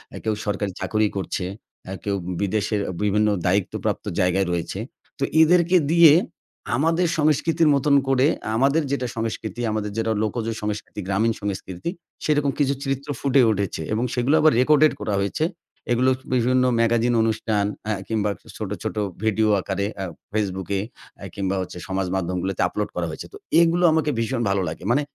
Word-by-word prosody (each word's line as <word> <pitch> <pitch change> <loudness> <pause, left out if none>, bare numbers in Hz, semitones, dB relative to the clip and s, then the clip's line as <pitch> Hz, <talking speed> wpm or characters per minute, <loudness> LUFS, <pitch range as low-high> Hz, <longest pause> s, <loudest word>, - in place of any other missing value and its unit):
এ - - -5
কেউ 110 - 0
সরকারি 105 -1 -1
চাকুরি 110 -1 +1
করছে, 95 -1 -3 0.5
এ - - -3
কেউ 100 -1 -1 0.3
বিদেশের 105 +1 0 0.2
বিভিন্ন 105 +1 +2 0.2
দায়িত্ব 95 +1 +1
প্রাপ্ত - - -2
জায়গায় 90 +1 +2
রয়েছে। 85 -1 -3 0.4
তো - - -1 0.2
এদেরকে 175 +2 +5
দিয়ে 165 -3 +8 0.6
আমাদের 165 +6 +2
সংস্কৃতির 155 +1 +2
মতন 140 +1 +3
করে 135 0 +3 0.3
আমাদের 140 +7 +3
যেটা 130 -3 -1
সংস্কৃতি, 115 -1 -4
আমাদের 105 -1 -2
যেটা 115 0 0
লোকজ 110 +1 -2 0.2
সংস্কৃতি, 105 0 -4
গ্রামীণ 110 +4 +1
সংস্কৃতি। 95 - -4 0.3
সেরকম 145 -2 +2
কিছু 140 -1 +2
চিত্র 135 +1 -3
ফুটে 140 -1 +3
উঠেছে 100 -5 -2
এবং 110 +3 0
সেগুলা 130 +5 +2
আবার 155 0 +5
রেকর্ডেড 150 +3 +5
করা 105 0 -2
হয়েছে। 100 +10 0 0.5
এগুলো 125 +2 +3 0.2
বিভিন্ন 125 +1 +3 0.2
ম্যাগাজিন 115 +1 +2
অনুষ্ঠান 110 -2 0 0.2
আ - - +1 0.2
কিংবা 105 -2 0 0.3
ছোট, 105 -3 -4
ছোট 110 - -3 0.3
ভিডিও 110 0 +2
আকারে 100 +1 -2 0.2
আ - - -1 0.3
Facebook 95 -4 -2
এ - - -1 0.4
আ - - -9
কিংবা 95 -1 -1
হচ্ছে 90 -1 -7
সমাজ 95 -1 -1
মাধ্যমগুলোতে 90 +1 -2
আপলোড - - -3
করা - - -1
হয়েছে। - - -7
তো - - -8 0.2
এগুলো 170 +1 +3
আমাকে 160 -1 +1
ভীষণ 120 +2 -1
ভালো 95 0 +1
লাগে। - - -8
মানে 140 +4 +3
110 Hz, 160 wpm, -23 LUFS, 100-140 Hz, 0.6 s, দিয়ে